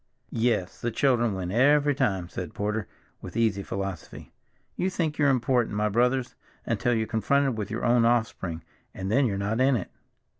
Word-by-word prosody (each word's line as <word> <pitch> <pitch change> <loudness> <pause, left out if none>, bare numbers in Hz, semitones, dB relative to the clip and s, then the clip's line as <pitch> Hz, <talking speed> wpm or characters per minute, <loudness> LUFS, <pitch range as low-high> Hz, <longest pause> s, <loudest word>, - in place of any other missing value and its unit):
"Yes, 115 -6 0
the 120 - 0
children 120 -3 +2
win 90 -1 -4
every 145 +5 +4
time," 95 -9 0
said 90 -1 -7
Porter 105 0 -2 0.3
with - - -7
easy 110 -4 +1
philosophy. 95 -3 -6 0.4
"You 185 - 0
think 160 -5 -2
you're 145 -2 +4
important, 125 -3 +1
my 105 +1 +1
brothers, 125 +4 +1 0.3
until 120 -1 0
you're 110 0 0
confronted 130 +4 +1
with 105 -3 -4
your 115 +1 -3
own 120 0 +4
offspring, 110 -8 0 0.3
and 95 +1 -4
then 135 +3 +3
you're 100 -3 -2
not 105 +5 -1
in 135 0 +4
it." 100 - -4
115 Hz, 175 wpm, -26 LUFS, 100-130 Hz, 0.4 s, every